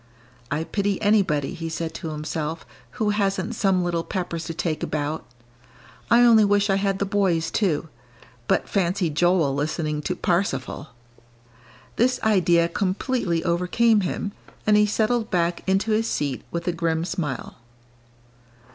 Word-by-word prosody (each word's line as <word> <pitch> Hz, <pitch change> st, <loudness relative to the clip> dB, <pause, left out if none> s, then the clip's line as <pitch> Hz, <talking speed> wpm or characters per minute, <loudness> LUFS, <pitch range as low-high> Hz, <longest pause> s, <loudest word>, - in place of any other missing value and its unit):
"I 150 Hz, +2 st, -1 dB
pity 200 Hz, +2 st, -1 dB
anybody," 195 Hz, -10 st, +2 dB
he 165 Hz, -1 st, -5 dB
said 160 Hz, 0 st, -4 dB
to 165 Hz, -, -5 dB
himself, 155 Hz, +1 st, -4 dB, 0.3 s
"who 215 Hz, -3 st, 0 dB
hasn't 200 Hz, +1 st, 0 dB
some 195 Hz, -4 st, +1 dB
little 170 Hz, -1 st, -1 dB
Peppers 175 Hz, -3 st, -4 dB
to 165 Hz, -, -4 dB
take 155 Hz, -2 st, -2 dB
about; 150 Hz, +1 st, -2 dB, 0.9 s
I 235 Hz, +1 st, +6 dB
only 230 Hz, -3 st, +7 dB
wish 205 Hz, 0 st, +3 dB
I 195 Hz, -, +3 dB
had 195 Hz, -1 st, 0 dB
the 200 Hz, -, -1 dB
boys, 190 Hz, -5 st, +1 dB
too. 165 Hz, -7 st, 0 dB, 0.6 s
But -, -, +1 dB
fancy 180 Hz, -3 st, 0 dB
Joel 165 Hz, -2 st, +2 dB
listening 150 Hz, +1 st, -2 dB
to 180 Hz, +4 st, -2 dB
'Parsifal'!" 165 Hz, -7 st, -1 dB, 1.1 s
This 250 Hz, +2 st, +2 dB
idea 175 Hz, -5 st, +3 dB
completely 185 Hz, 0 st, -1 dB
overcame 190 Hz, +6 st, +2 dB
him, 200 Hz, +2 st, -3 dB, 0.3 s
and 215 Hz, -, +4 dB
he 210 Hz, 0 st, +5 dB
settled 220 Hz, +2 st, 0 dB
back 170 Hz, -1 st, 0 dB
into 195 Hz, +3 st, +1 dB
his 220 Hz, +1 st, +1 dB
seat 140 Hz, -, -2 dB
with 170 Hz, +1 st, -4 dB
a -, -, +3 dB
grim 165 Hz, -1 st, -1 dB
smile. 160 Hz, -, -4 dB
180 Hz, 145 wpm, -24 LUFS, 160-205 Hz, 1.1 s, only